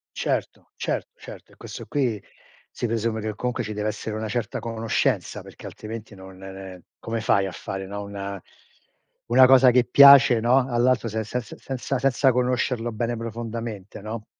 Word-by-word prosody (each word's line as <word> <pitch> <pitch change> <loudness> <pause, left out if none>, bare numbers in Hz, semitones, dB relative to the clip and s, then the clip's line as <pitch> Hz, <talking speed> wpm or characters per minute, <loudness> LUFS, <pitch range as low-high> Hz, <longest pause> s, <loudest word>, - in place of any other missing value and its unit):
Certo, - - -3
cer - - -2
certo, - - -12
è - - -20
questo - - -9
qui 125 -8 -1 0.5
si 120 - -3
presume 110 -1 -1
che 110 -1 -4
comunque 120 +1 -2
ci 110 0 -5
deve 105 +1 -3
essere 110 0 -4
una 110 0 -3
certa 115 +1 -3
conoscenza 115 -1 -1
perché - - -14
altrimenti 110 0 -8
non 95 0 -13
ne 95 0 -9
ne 95 -2 -10 0.2
come 115 0 -4
fai 100 -3 +2
a 95 - -6
fare 95 +1 -6
no, 100 +1 -6
una 100 -1 -6 0.9
una 130 +2 +7
cosa 130 0 +7
che 125 0 +4
piace, 140 -4 +8
no, 125 +3 +3
all'altro 120 0 +2
se 110 0 -3
se 125 +4 -3
se - - -12
se 135 -1 -6
senza 130 +1 -2
senza 135 0 +3
conoscerlo 125 -1 0
bene 120 +2 -2
profondamente, 115 -3 -6
no? 110 +1 -6
115 Hz, 180 wpm, -24 LUFS, 105-125 Hz, 0.9 s, piace